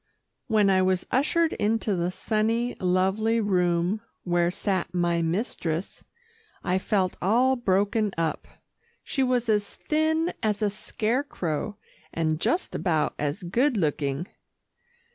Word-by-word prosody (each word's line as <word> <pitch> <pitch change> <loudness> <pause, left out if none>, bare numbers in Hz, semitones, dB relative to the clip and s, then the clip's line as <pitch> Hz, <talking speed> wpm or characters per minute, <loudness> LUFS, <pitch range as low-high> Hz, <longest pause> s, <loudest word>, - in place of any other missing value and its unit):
When 210 -4 +4
I 190 0 +4
was 185 -1 +1
ushered 315 +5 +2
into 215 -1 0
the 175 0 0
sunny, 225 +5 0
lovely 190 +5 +2
room 180 -1 +1 0.2
where 175 -1 +2
sat 185 -1 -2
my 170 -1 +1
mistress, 170 -1 -2 0.6
I 185 +1 +1
felt 190 -2 0
all 245 +8 +3
broken 205 -1 +1
up. 165 -2 -1 0.6
She 270 - -2
was 250 -2 +1
as 210 -2 0
thin 315 +2 +1
as 215 -2 0
a 205 - +2
scarecrow, 215 - -2 0.3
and 155 -1 0
just 350 - 0
about 160 -5 0
as 145 +4 -2
good 240 +9 +1
looking. 150 -1 -1
200 Hz, 125 wpm, -26 LUFS, 175-230 Hz, 0.6 s, When